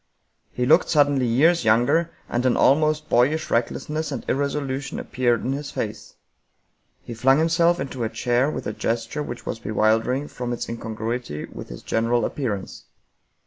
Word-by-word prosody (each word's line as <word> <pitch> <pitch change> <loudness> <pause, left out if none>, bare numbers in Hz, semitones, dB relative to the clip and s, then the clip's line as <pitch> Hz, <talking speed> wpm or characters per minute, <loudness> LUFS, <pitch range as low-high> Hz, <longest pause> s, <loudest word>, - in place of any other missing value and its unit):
He 125 - -1
looked 160 +7 +4
suddenly 145 -4 +3
years 155 +9 +3
younger, 120 +10 +3 0.2
and 120 - -1
an 125 - +2
almost 155 +2 +3
boyish 145 +6 +2
recklessness 150 +6 -1
and 130 - -5
irresolution 140 -1 -2
appeared 120 -2 0
in 130 - 0
his 140 +1 -5
face. 105 -1 -5 0.9
He 120 - -7
flung 135 +4 +3
himself 170 +2 +3
into 130 -3 -4
a 110 - -1
chair 120 +4 +1
with - - -5
a 105 - -3
gesture 115 +6 -2
which 120 -4 -6
was 110 - -4
be 110 - -7
wildering 110 +6 +1
from 125 -3 -4
its 120 - -4
incongruity 115 -6 -4
with - - -10
his - - -9
general 115 +1 +1
appearance. 110 -9 -4
125 Hz, 160 wpm, -23 LUFS, 115-145 Hz, 0.9 s, looked